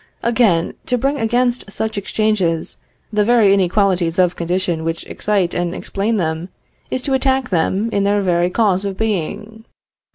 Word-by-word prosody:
Again, 225 Hz, -8 st, +2 dB
to 250 Hz, -, +1 dB
bring 275 Hz, +4 st, 0 dB
against 240 Hz, -1 st, 0 dB
such 220 Hz, +2 st, -3 dB
exchanges 200 Hz, -5 st, 0 dB, 0.4 s
the 210 Hz, 0 st, +3 dB
very 220 Hz, -3 st, +4 dB
inequalities 185 Hz, -3 st, +1 dB
of 180 Hz, -1 st, +3 dB
condition 175 Hz, -1 st, -1 dB
which 165 Hz, 0 st, -3 dB
excite 195 Hz, -4 st, -1 dB
and 175 Hz, 0 st, -2 dB
explain 205 Hz, +3 st, -2 dB
them, 160 Hz, 0 st, -2 dB, 0.4 s
is 255 Hz, -, -2 dB
to 275 Hz, -, -1 dB
attack 265 Hz, 0 st, +1 dB
them 190 Hz, +4 st, +1 dB
in 200 Hz, -, +1 dB
their 200 Hz, 0 st, +2 dB
very 175 Hz, -1 st, +2 dB
cause 195 Hz, -1 st, +1 dB
of 195 Hz, -1 st, -4 dB
being. 215 Hz, +1 st, -3 dB
200 Hz, 155 wpm, -18 LUFS, 175-225 Hz, 0.4 s, very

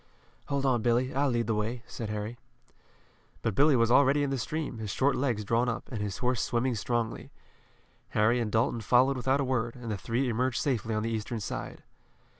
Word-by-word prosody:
"Hold 140 Hz, -1 st, -1 dB
on, 125 Hz, -4 st, +2 dB
Billy, 120 Hz, +3 st, +1 dB
I'll 140 Hz, +1 st, +2 dB
lead 120 Hz, -2 st, 0 dB
the 110 Hz, -, 0 dB
way," 110 Hz, +3 st, -2 dB
said 115 Hz, -3 st, -6 dB
Harry. 105 Hz, +3 st, -4 dB, 1.0 s
But 115 Hz, -, 0 dB
Billy 145 Hz, +5 st, +5 dB
was 115 Hz, -1 st, +3 dB
already 140 Hz, +2 st, +5 dB
in 140 Hz, -, -1 dB
the 135 Hz, -, 0 dB
stream, 150 Hz, -1 st, -3 dB
his 110 Hz, -2 st, -4 dB
short 135 Hz, +7 st, +2 dB
legs 120 Hz, -6 st, 0 dB
drawn 115 Hz, +4 st, +2 dB
up, 120 Hz, -, -4 dB
and 110 Hz, -4 st, -3 dB
his 100 Hz, -2 st, -3 dB
horse 125 Hz, -1 st, 0 dB
swimming 125 Hz, +1 st, 0 dB
strongly. 115 Hz, +1 st, -2 dB, 0.9 s
Harry 110 Hz, +3 st, +4 dB
and 115 Hz, -3 st, -2 dB
Dalton 115 Hz, +1 st, +1 dB
followed 130 Hz, +5 st, +4 dB
without 130 Hz, +2 st, +1 dB
a -, -, +1 dB
word, 120 Hz, -3 st, -1 dB
and 120 Hz, -3 st, -6 dB
the 105 Hz, -, -2 dB
three 120 Hz, +7 st, -1 dB
emerged 125 Hz, +1 st, 0 dB
safely 115 Hz, -5 st, -1 dB
on 110 Hz, -, -1 dB
the 115 Hz, -, -2 dB
eastern 110 Hz, +1 st, -3 dB
side. 105 Hz, -, -6 dB
120 Hz, 205 wpm, -29 LUFS, 110-130 Hz, 1.0 s, Billy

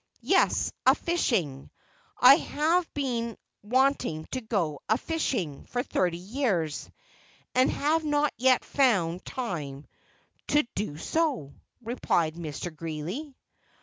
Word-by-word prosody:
"Yes, -, -, +3 dB
a -, -, +6 dB
fishing; 190 Hz, -, -1 dB, 0.5 s
I 260 Hz, +3 st, +9 dB
have 330 Hz, +3 st, 0 dB
been 235 Hz, -5 st, -2 dB, 0.2 s
wanting 250 Hz, -, +1 dB
to 260 Hz, -, -2 dB
go 185 Hz, -, -1 dB
a 220 Hz, -, +4 dB
fishing 245 Hz, -, -2 dB
for 245 Hz, 0 st, -2 dB
thirty 175 Hz, -7 st, 0 dB
years, 185 Hz, -, -2 dB, 0.6 s
and 255 Hz, +1 st, +4 dB
have 315 Hz, +3 st, +1 dB
not 295 Hz, -1 st, +1 dB
yet 255 Hz, +2 st, +3 dB
found 190 Hz, -11 st, +2 dB
time 150 Hz, -, -5 dB, 0.6 s
to 295 Hz, +1 st, +3 dB
do 190 Hz, -7 st, -3 dB
so," 275 Hz, -, -1 dB, 0.3 s
replied 175 Hz, -9 st, 0 dB
Mr. 165 Hz, 0 st, -6 dB
Greeley. 165 Hz, -, -5 dB
230 Hz, 115 wpm, -28 LUFS, 165-275 Hz, 0.6 s, I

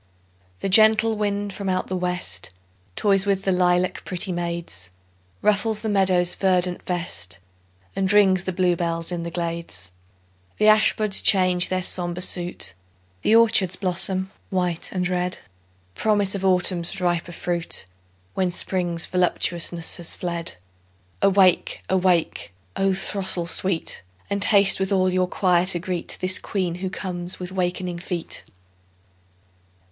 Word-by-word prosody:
The -, -, -1 dB
gentle 220 Hz, +2 st, +5 dB
wind 205 Hz, -1 st, -2 dB
from 195 Hz, -1 st, -4 dB
out 185 Hz, 0 st, 0 dB
the 185 Hz, -, -4 dB
west 180 Hz, -, -2 dB, 0.5 s
Toys 195 Hz, -1 st, +2 dB
with 195 Hz, -1 st, +1 dB
the 195 Hz, -, +1 dB
lilac 180 Hz, 0 st, +1 dB
pretty 185 Hz, +1 st, -3 dB
maids; 170 Hz, -, -5 dB, 0.5 s
Ruffles 210 Hz, +1 st, +1 dB
the 220 Hz, -, -3 dB
meadow's 185 Hz, -3 st, +2 dB
verdant 180 Hz, -2 st, 0 dB
vest, 170 Hz, -, -2 dB, 0.6 s
And 190 Hz, 0 st, 0 dB
rings 190 Hz, -3 st, +4 dB
the 185 Hz, -, -1 dB
bluebells 175 Hz, -2 st, -1 dB
in 175 Hz, -1 st, -3 dB
the 170 Hz, -, -4 dB
glades; 165 Hz, -, -5 dB, 0.7 s
The 215 Hz, -, +3 dB
ash 215 Hz, 0 st, +5 dB
buds 215 Hz, -2 st, +4 dB
change 185 Hz, -2 st, +3 dB
their 185 Hz, 0 st, -1 dB
sombre 175 Hz, 0 st, 0 dB
suit, 175 Hz, -, 0 dB, 0.5 s
The 220 Hz, -, +3 dB
orchards 220 Hz, -5 st, +5 dB
blossom 190 Hz, 0 st, 0 dB, 0.2 s
white 180 Hz, -3 st, -1 dB
and 180 Hz, -1 st, -1 dB
red— 180 Hz, 0 st, -1 dB, 0.6 s
Promise 205 Hz, -, +1 dB
of 195 Hz, -1 st, -4 dB
Autumn's 180 Hz, 0 st, +2 dB
riper 175 Hz, -1 st, -1 dB
fruit, 170 Hz, -, -1 dB, 0.5 s
When 185 Hz, -1 st, 0 dB
Spring's 175 Hz, -1 st, -2 dB
voluptuousness 175 Hz, -1 st, -1 dB
has 170 Hz, -2 st, 0 dB
fled. 170 Hz, -, -3 dB, 0.7 s
Awake! 195 Hz, -2 st, +3 dB
awake, 180 Hz, -, 0 dB, 0.2 s
O 195 Hz, -1 st, +1 dB
throstle 190 Hz, -2 st, -2 dB
sweet! 175 Hz, -, -1 dB, 0.3 s
And 200 Hz, 0 st, 0 dB
haste 200 Hz, -2 st, +5 dB
with 190 Hz, +1 st, -1 dB
all 185 Hz, -1 st, +2 dB
your 185 Hz, 0 st, +1 dB
choir 180 Hz, -1 st, +1 dB
to 180 Hz, -, +4 dB
greet 180 Hz, 0 st, -3 dB
This 185 Hz, 0 st, +2 dB
Queen 185 Hz, -4 st, -2 dB
who 190 Hz, -, -2 dB
comes 180 Hz, -2 st, -6 dB
with 180 Hz, 0 st, -6 dB
wakening 180 Hz, -1 st, -2 dB
feet. 175 Hz, -1 st, -4 dB
185 Hz, 135 wpm, -23 LUFS, 175-195 Hz, 0.7 s, gentle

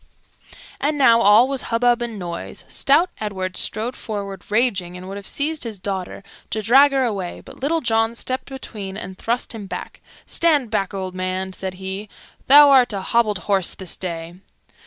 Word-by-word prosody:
And 295 Hz, +1 st, 0 dB
now 235 Hz, -4 st, +5 dB
all 210 Hz, +4 st, +6 dB
was 275 Hz, -1 st, -2 dB
hubbub 240 Hz, +1 st, +2 dB
and 235 Hz, -2 st, -4 dB
noise. 175 Hz, -3 st, -6 dB
Stout 320 Hz, +6 st, +2 dB
Edward 190 Hz, -3 st, -4 dB
strode 230 Hz, +4 st, -2 dB
forward 200 Hz, -3 st, -6 dB
raging, 200 Hz, -6 st, 0 dB
and 180 Hz, +1 st, -9 dB
would 195 Hz, -, -6 dB
have 200 Hz, -, -8 dB
seized 305 Hz, +2 st, -1 dB
his 225 Hz, -4 st, -6 dB
daughter 190 Hz, 0 st, -5 dB, 0.3 s
to 215 Hz, -, -2 dB
drag 270 Hz, +6 st, +6 dB
her 270 Hz, -1 st, +2 dB
away, 200 Hz, -7 st, -3 dB
but -, -, -14 dB
Little 320 Hz, +5 st, 0 dB
John 225 Hz, -1 st, +1 dB
stepped 255 Hz, +2 st, -3 dB
between 210 Hz, -7 st, -7 dB
and 190 Hz, -2 st, -7 dB
thrust 235 Hz, +6 st, -1 dB
him 210 Hz, -3 st, -7 dB
back. -, -, -7 dB, 0.2 s
"Stand 295 Hz, -9 st, +2 dB
back, 195 Hz, -3 st, -1 dB
old 185 Hz, -1 st, -4 dB
man," 185 Hz, +1 st, -3 dB
said 190 Hz, 0 st, -4 dB
he, 190 Hz, +2 st, -5 dB, 0.4 s
"thou 285 Hz, +1 st, +9 dB
art 255 Hz, -4 st, +5 dB
a 195 Hz, -, -3 dB
hobbled 215 Hz, 0 st, +1 dB
horse 195 Hz, -4 st, +1 dB
this 185 Hz, -3 st, -5 dB
day." 170 Hz, -2 st, -5 dB
215 Hz, 180 wpm, -21 LUFS, 190-250 Hz, 0.4 s, thou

